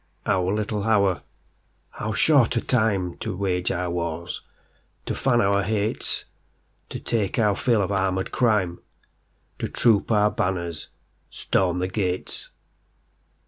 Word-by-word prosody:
Our 90 -1 +1
little 105 0 -1
hour,—how 105 +1 -2
short 130 +2 +4
a - - +4
timeTo 100 -8 0
wage 90 -2 0
our 90 0 -2
wars, 85 0 -3 0.6
to - - -2
fan 120 -3 +2
our 100 -1 +3
hates, 105 +2 -1 0.6
To - - -5
take 110 -3 -1
our 105 -4 +3
fill 115 -2 +2
of 95 - -2
armoured 95 -1 0
crime, 105 -8 +1 0.8
To - - -2
troop 110 -2 +3
our 105 -1 +4
banners, 85 -3 -2 0.4
storm 90 -2 0
the 90 +1 0
gates. 95 -2 -3
100 Hz, 120 wpm, -24 LUFS, 90-110 Hz, 0.8 s, short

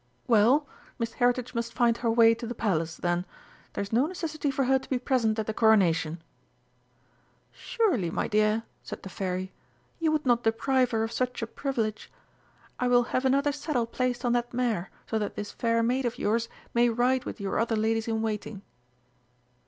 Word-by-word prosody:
"Well, 245 +6 +4 0.3
Miss 230 -1 -3
Heritage 245 0 +1
must 235 -1 -3
find 235 -1 +3
her 235 - -1
way 230 0 +6
to 230 +1 -6
the 240 - -5
Palace, 170 -7 -1
then! 175 0 0 0.5
There's 200 +2 -4
no 250 +6 +3
necessity 310 -4 -3
for 275 0 0
her 265 +1 +3
to - - -14
be 260 - +1
present 245 -4 +1
at 220 - -1
the 220 - -3
Coronation." 170 -8 +3 1.3
"Surely, 350 - 0
my - - -1
dear," 215 +1 +2 0.2
said - - -8
the 195 - -7
Fairy, 185 0 -3 0.5
"you 320 -2 +2
would 305 -2 0
not 240 -2 +3
deprive 250 +3 +2
her 225 -1 0
of 225 - -3
such 250 -1 -2
a - - 0
privilege! 230 -4 -3 0.7
I 250 - +1
will 245 0 +5
have 255 - +1
another 280 +2 +3
saddle 285 -4 -1
placed 245 +1 -2
on 240 - +2
that 240 0 -1
mare 230 -8 0 0.2
so 220 - -1
that 210 - -3
this 205 -1 -5
fair 230 -1 +1
maid 250 +3 +1
of 235 - -4
yours 230 +2 0 0.2
may 240 0 +4
ride 250 +2 +1
with - - -6
your 200 -1 -2
other 230 0 +1
ladies 220 +1 0
in 225 -1 -1
waiting." 210 -2 -4
230 Hz, 185 wpm, -28 LUFS, 215-255 Hz, 1.3 s, way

